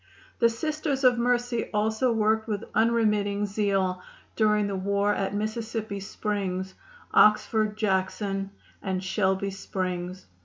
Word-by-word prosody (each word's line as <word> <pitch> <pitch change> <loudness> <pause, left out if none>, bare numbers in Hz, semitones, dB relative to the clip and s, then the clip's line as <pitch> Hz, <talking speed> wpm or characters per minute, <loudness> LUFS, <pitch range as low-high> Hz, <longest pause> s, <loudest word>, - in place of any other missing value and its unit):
The 235 - +5
Sisters 300 +2 -2
of 250 -2 +5
Mercy 245 0 0
also 220 +4 +1
worked 220 0 +1
with 210 -1 -2
unremitting 210 -3 +2
zeal 195 -3 0 0.3
during 210 -1 +3
the 200 -1 -2
war 200 +2 +1
at 195 0 -2
Mississippi 220 -1 -3
Springs, 190 -2 -3 0.4
Oxford, 215 0 +4
Jackson 195 -1 -1 0.3
and 190 -1 -2
Shelby 190 0 0
Springs. 185 -1 -4
210 Hz, 115 wpm, -27 LUFS, 195-220 Hz, 0.4 s, The